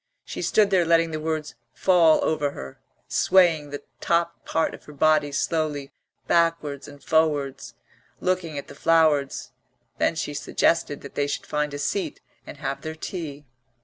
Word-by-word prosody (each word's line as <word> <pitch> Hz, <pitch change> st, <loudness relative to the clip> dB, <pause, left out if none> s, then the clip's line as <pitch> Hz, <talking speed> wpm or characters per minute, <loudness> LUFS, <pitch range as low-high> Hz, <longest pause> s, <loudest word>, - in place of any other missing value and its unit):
She -, -, -6 dB
stood 210 Hz, -2 st, +3 dB
there 185 Hz, -2 st, +4 dB
letting 165 Hz, 0 st, +3 dB
the 155 Hz, -, -3 dB
words 155 Hz, -1 st, -3 dB, 0.2 s
fall 170 Hz, -4 st, +4 dB
over 145 Hz, -2 st, 0 dB
her, 65 Hz, 0 st, -9 dB, 0.3 s
swaying 165 Hz, -6 st, +3 dB
the 145 Hz, 0 st, -7 dB, 0.2 s
top 170 Hz, 0 st, 0 dB
part 160 Hz, -, 0 dB
of -, -, -12 dB
her 150 Hz, -, -11 dB
body 150 Hz, 0 st, +3 dB
slowly 150 Hz, -1 st, -1 dB, 0.3 s
backwards 165 Hz, -5 st, +1 dB
and 145 Hz, 0 st, -13 dB
forwards, 150 Hz, -4 st, 0 dB, 0.4 s
looking 180 Hz, -4 st, -1 dB
at 140 Hz, -, -6 dB
the -, -, -11 dB
flowers. 150 Hz, -2 st, +2 dB, 0.5 s
Then -, -, +2 dB
she 155 Hz, -2 st, -3 dB
suggested 145 Hz, +1 st, 0 dB
that 140 Hz, -, -10 dB
they 145 Hz, 0 st, 0 dB
should 145 Hz, -, -3 dB
find 150 Hz, 0 st, -1 dB
a 145 Hz, -, -5 dB
seat 165 Hz, +2 st, -2 dB, 0.3 s
and -, -, -9 dB
have 140 Hz, -1 st, -4 dB
their 155 Hz, 0 st, -5 dB
tea. 155 Hz, -4 st, -6 dB
155 Hz, 160 wpm, -25 LUFS, 145-165 Hz, 0.5 s, there